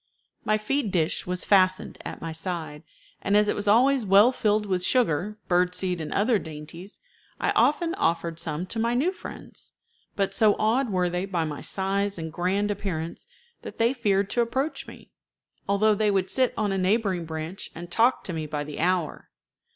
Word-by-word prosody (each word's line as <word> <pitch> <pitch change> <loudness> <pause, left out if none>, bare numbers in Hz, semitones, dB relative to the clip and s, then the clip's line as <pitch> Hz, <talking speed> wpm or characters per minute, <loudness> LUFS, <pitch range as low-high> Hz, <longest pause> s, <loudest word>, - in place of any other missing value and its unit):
My 215 - +2
feed 225 +3 -1
dish 170 -3 -1
was 180 0 -3
fastened 185 -2 +2
at - - -7
my 165 - -4
side, 160 -2 -4 0.4
and 205 - +2
as 210 0 +4
it - - +1
was 205 0 -3
always 255 +5 +4
well 205 +4 +6
filled 210 -4 +1
with 185 -3 -1
sugar, 210 - +1
bird 180 0 +2
seed, 180 -2 -1
and 155 - -5
other 215 +1 +2
dainties, 160 +4 -9 0.4
I - - +1
often 330 +3 +2
offered 165 - -1
some 165 0 -3
to 225 +4 -4
my 235 +2 +1
new 300 +9 +2
friends; 380 - -11 0.4
but 195 -1 0
so 210 0 +4
awed 235 +4 +1
were 180 -2 +1
they 180 +2 -2
by 175 -4 -1
my 150 -2 -5
size 195 +1 -1
and 160 -1 -6
grand 195 +4 0
appearance 170 -5 -4 0.3
that - - -9
they 230 +3 +3
feared 200 -5 0
to 240 - +2
approach 265 +6 -2
me, - - -13 0.6
although 210 +2 +4
they 210 +1 +1
would 190 -2 0
sit 255 -2 +2
on 205 -2 0
a 195 - 0
neighboring 190 -2 +1
branch 160 +3 -6
and 175 +1 -8
talk 235 +6 +3
to 185 - -4
me 160 -1 -3
by 150 0 -3
the 150 0 -8
hour. 175 -2 -1
195 Hz, 190 wpm, -26 LUFS, 175-215 Hz, 0.6 s, well